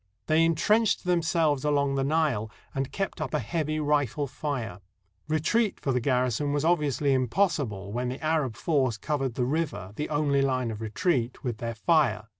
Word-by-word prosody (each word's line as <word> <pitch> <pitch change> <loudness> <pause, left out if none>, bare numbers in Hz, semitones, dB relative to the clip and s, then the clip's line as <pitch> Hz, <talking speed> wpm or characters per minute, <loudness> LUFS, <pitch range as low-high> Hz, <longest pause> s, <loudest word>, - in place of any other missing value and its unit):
They 160 +1 +3
intrenched 210 +7 +2
themselves 165 -5 +1
along 140 -2 +1
the 135 0 0
Nile, 140 -7 +1 0.2
and 135 -1 -2
kept 195 -4 -3
up 140 -4 -2
a - - +2
heavy 155 -2 -2
rifle 145 -2 +1
fire. 125 - -4 0.5
Retreat 185 +8 +1
for 135 - -1
the 125 - +1
garrison 125 +2 0
was 145 +1 0
obviously 150 -5 +2
impossible 130 - 0
when 125 +1 -1
the 130 - -5
Arab 155 -7 +1
force 130 -4 +1
covered 135 -1 -2
the 125 - 0
river, 145 - -2
the 150 - -3
only 145 -2 +2
hne 130 -3 0
of 110 0 -7
retreat, 125 - -1
with 120 -5 -3
their 115 -1 -4
fire. 120 -6 +2
140 Hz, 170 wpm, -27 LUFS, 125-155 Hz, 0.5 s, They